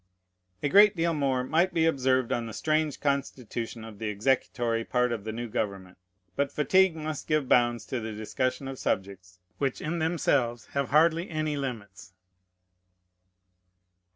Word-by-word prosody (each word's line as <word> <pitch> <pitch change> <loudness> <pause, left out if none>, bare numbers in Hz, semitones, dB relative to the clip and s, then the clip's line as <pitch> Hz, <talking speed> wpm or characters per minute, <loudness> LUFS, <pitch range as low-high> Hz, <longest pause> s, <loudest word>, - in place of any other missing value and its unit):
A - - +2
great 205 +6 +6
deal 170 0 +1
more 135 -4 0
might 165 +7 +1
be 160 -1 +3
observed 130 -5 +1
on 115 -1 -1
the 110 - -7
strange 155 -2 0
constitution 125 -5 -3
of 110 -3 -11
the 110 - -3
executory 115 +1 0
part 125 +1 +1
of 110 -3 -4
the 110 - -3
new 120 +2 -5
government; 100 -4 -4 0.4
but 140 -1 0
fatigue 185 +4 +3
must 155 -2 -5
give 155 -3 +1
bounds 120 -1 +3
to 130 - -3
the 110 -1 -5
discussion 130 +5 -2
of 135 -1 -6
subjects 95 -2 -3 0.2
which 135 -2 -1
in 170 +3 -3
themselves 140 -8 0
have 140 -1 -1
hardly 165 +4 +3
any 155 -2 -2
limits. 105 -9 -6
130 Hz, 155 wpm, -28 LUFS, 115-155 Hz, 0.4 s, great